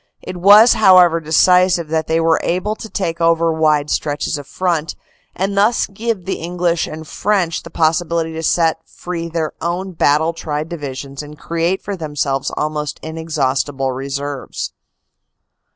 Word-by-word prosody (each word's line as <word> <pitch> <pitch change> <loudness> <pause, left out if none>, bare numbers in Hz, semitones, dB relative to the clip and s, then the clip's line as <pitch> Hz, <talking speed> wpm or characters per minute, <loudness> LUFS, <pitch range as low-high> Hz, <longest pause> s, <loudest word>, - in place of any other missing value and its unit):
It 180 - -7
was, 205 +6 +7
however, 180 -5 +6
decisive 175 +1 +3
that 160 0 -1
they 160 +1 +1
were 165 0 +2
able 185 +5 -1
to 220 - -9
take 170 -4 -3
over 165 0 +3
wide 155 -2 +1
stretches 145 +1 -1
of 145 -2 -7
front, 170 -4 -1 0.4
and 195 +2 -2
thus 210 +4 +3
give 215 -2 -4
the 190 - -3
English 175 0 -1
and 155 0 -8
French 190 -4 0
the 170 - -11
possibility 165 0 0
to 160 - -5
set 165 0 +1
free 170 -1 -6
their 160 -2 -2
own 175 +3 -3
battle 160 0 +2
tried 155 -1 -4
divisions 140 -4 -6
and 150 0 -11
create 170 +4 -2
for 200 - -4
themselves 145 -5 -2
almost 150 -1 -3
inexhaustible 145 -4 -2
reserves. 140 +1 -5
165 Hz, 150 wpm, -18 LUFS, 150-180 Hz, 0.4 s, was